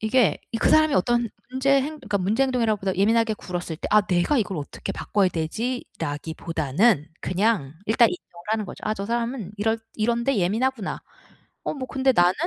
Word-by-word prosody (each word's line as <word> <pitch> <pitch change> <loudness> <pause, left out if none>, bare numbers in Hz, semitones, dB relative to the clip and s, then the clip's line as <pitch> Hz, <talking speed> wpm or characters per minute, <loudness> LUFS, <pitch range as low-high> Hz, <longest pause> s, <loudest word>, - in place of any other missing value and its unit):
이게 225 +1 +3
이 - - 0
그 - - +2
사람이 310 -1 +5
어떤 235 +5 +2 0.2
문제 265 +2 0
행 305 +2 -4
그러니까 210 -7 -2
문제 210 +8 +1
행동이라기 230 -5 +1
보다 190 -1 -1
예민하게 225 +2 +3
굴었을 175 -4 -5
때 - - -5
'아 215 - +7
내가 185 +9 +1
이걸 200 -5 -1
어떻게 145 - -5
바꿔야 200 -3 +1
되지?'라기보다는 160 - -1
그냥 185 -7 0
일단 225 +2 +5
인정을 175 -1 -9
하는 220 -1 0
거죠. - - -9
아 215 - 0
저 200 - -4
사람은 235 -3 -2
이럴 220 +2 +1 0.2
'이런 235 +2 0
데 275 -3 +2
예민하구나. 220 +4 0 0.6
어 - - -2
뭐 260 -3 -5
근데 265 0 +2
나는 175 +1 +5
215 Hz, 400 characters per minute, -24 LUFS, 180-240 Hz, 0.6 s, 아